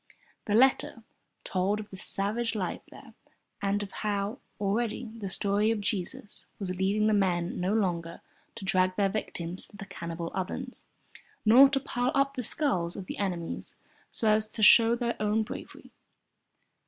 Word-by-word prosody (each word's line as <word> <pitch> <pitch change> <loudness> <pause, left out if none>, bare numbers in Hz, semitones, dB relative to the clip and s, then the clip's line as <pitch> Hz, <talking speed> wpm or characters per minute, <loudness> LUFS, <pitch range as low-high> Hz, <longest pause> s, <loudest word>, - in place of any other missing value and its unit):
The 210 - +1
letter 255 -1 +3 0.4
told 195 +3 0
of 215 0 -8
the - - -7
savage 215 +5 -1
life 185 -4 -2
there - - -14 0.5
and 200 +1 0
of 195 - -8
how, 205 +4 -2 0.2
already, 220 +3 -1
the 205 -4 -5
story 205 +3 +1
of 225 -1 +1
Jesus 200 0 -4
was 185 -3 -3
leading 195 +3 +1
the 215 - +3
men 180 -3 +1
no 180 +2 0
longer 170 -5 -1 0.3
to 220 -4 -7
drag 185 -1 +2
their 200 -1 +2
victims 180 -3 -4
to 205 - -15
the 195 - -7
cannibal 170 -3 -5
ovens, 250 +7 -4 0.6
nor 255 +6 +8
to 275 0 +1
pile 250 -1 -1
up 275 0 +2
the 255 - -2
skulls 210 - 0
of 190 - -6
their - - -5
enemies 175 -4 -4 0.3
so 225 - -1
as 215 0 +2
to 220 - -3
show 230 +2 +8
their 240 0 -1
own 215 +1 +2
bravery. - - -9
205 Hz, 165 wpm, -29 LUFS, 185-225 Hz, 0.6 s, nor